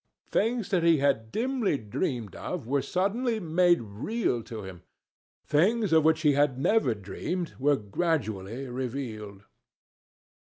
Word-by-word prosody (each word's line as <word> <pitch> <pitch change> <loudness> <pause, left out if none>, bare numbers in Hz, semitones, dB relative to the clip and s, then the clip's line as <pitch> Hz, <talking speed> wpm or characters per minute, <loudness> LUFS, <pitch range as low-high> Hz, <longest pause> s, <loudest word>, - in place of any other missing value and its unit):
Things 230 0 +1
that 185 -3 +2
he 165 -1 +5
had 135 -6 +1
dimly 240 - 0
dreamed 115 - -3
of 175 -9 -5
were 140 +3 +1
suddenly 220 - 0
made 175 - +3
real 120 - -2
to 110 -3 -7
him. 95 -2 -9 0.6
Things 195 +6 +2
of 160 -1 +6
which 160 0 +3
he 150 -2 +4
had 140 -2 +2
never 135 - +2
dreamed 165 - -4
were 145 +2 +3
gradually 110 - -2
revealed. 120 -6 -5
145 Hz, 130 wpm, -28 LUFS, 115-180 Hz, 0.6 s, of